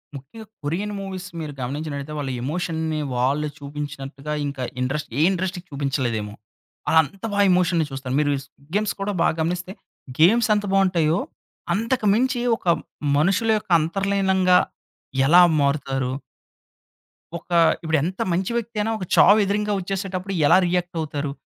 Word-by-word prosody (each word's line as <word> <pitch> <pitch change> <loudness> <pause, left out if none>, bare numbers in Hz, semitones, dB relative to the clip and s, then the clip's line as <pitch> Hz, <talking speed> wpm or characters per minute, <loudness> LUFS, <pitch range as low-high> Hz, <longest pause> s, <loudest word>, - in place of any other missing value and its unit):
ముఖ్యంగా 140 - -10 0.2
Korean 185 +8 -2
movies 190 -1 -6
మీరు 155 -2 -5
గమనించినట్టయితే 140 +2 -4
వాళ్ళు 135 -2 -3
ఎమోషన్‌ని 160 +1 -2 0.2
వాళ్ళు 135 +5 +1
చూపించినట్టుగా 145 0 -6
ఇంకా 140 -2 -5 0.2
ఇండస్ట్ర్ 135 0 -3
ఏ - - +3
ఇండస్ట్రీ 185 0 -2
చూపించలేదేమో. 130 -7 -2 0.5
వాళ్ళంత 160 +6 +2
బా 205 - 0
ఎమోషన్‌ని 175 -2 +2
చూస్తారు. 135 -1 -5
మీరు 145 -1 +2
'స్క్విడ్ 140 +2 -24
గేమ్స్' 210 0 0
కూడా 205 +1 -1
బాగా 165 - +2
గమనిస్తే 175 +2 -2 0.5
గేమ్స్ 220 +8 +5
ఎంత 205 - -1
బావుంటాయో, 180 -4 +2 0.5
అంతకు 225 +4 -1
మించి 250 +2 +1 0.2
ఒక - - -27 0.5
మనుషుల 195 +8 +2
యొక్క 210 - -9
అంతర్లీనంగా 190 +1 +2 0.7
ఎలా 175 +6 +7 0.2
మారుతారు 135 -2 0 1.3
ఒక 170 - -17 0.3
ఇప్పుడు 160 -1 +1
ఎంత 185 +3 -3
మంచి 185 +5 -1
వ్యక్తి 230 -1 -5
అయినా 225 +2 -1
ఒక 185 - -5
చావు 210 +2 +7
ఎదురింగా 210 +1 0
వచ్చేసేటప్పుడు, 195 0 -4
ఎలా - - +6
రియాక్టవుతారు. 160 -5 -2
170 Hz, 130 wpm, -23 LUFS, 145-195 Hz, 1.3 s, ఎలా